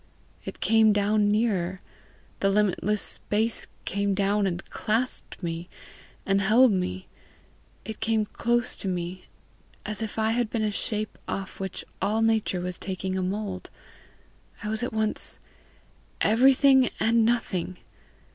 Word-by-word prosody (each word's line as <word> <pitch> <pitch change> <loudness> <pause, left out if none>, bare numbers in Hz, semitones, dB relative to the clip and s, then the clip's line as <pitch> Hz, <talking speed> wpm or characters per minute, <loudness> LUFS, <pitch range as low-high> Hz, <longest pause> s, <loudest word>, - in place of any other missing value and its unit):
It - - -7
came 220 -1 +5
down 205 0 +2
nearer; 195 -4 +1 0.6
the 195 - +2
limitless 210 0 +1
space 220 +2 -1 0.2
came 200 0 0
down, 200 +1 +2
and 175 -1 -4
clasped 225 -2 -2
me, 170 +1 -4 0.6
and 195 0 +2
held 225 +5 +5
me. 95 - -2 0.8
It 220 - -6
came 220 -1 +1
close 240 +3 0
to - - -4
me 180 0 -3 0.6
as 215 -1 -3
if 220 -1 -4
I 220 0 +2
had 235 -1 0
been 225 -1 -1
a 210 - +1
shape 215 +1 -3
off 195 -1 -5
which 190 -1 -4 0.2
all 220 +2 +1
nature 220 -5 +1
was 180 0 -4
taking 190 0 -3
a 190 - 0
mould. 190 0 -3 0.9
I 210 - -3
was 220 +1 -2
at 245 - -2
once 220 -1 -1 0.8
everything 265 +2 +5
and 230 +1 +3
nothing. 190 -6 0
210 Hz, 135 wpm, -26 LUFS, 190-225 Hz, 0.9 s, came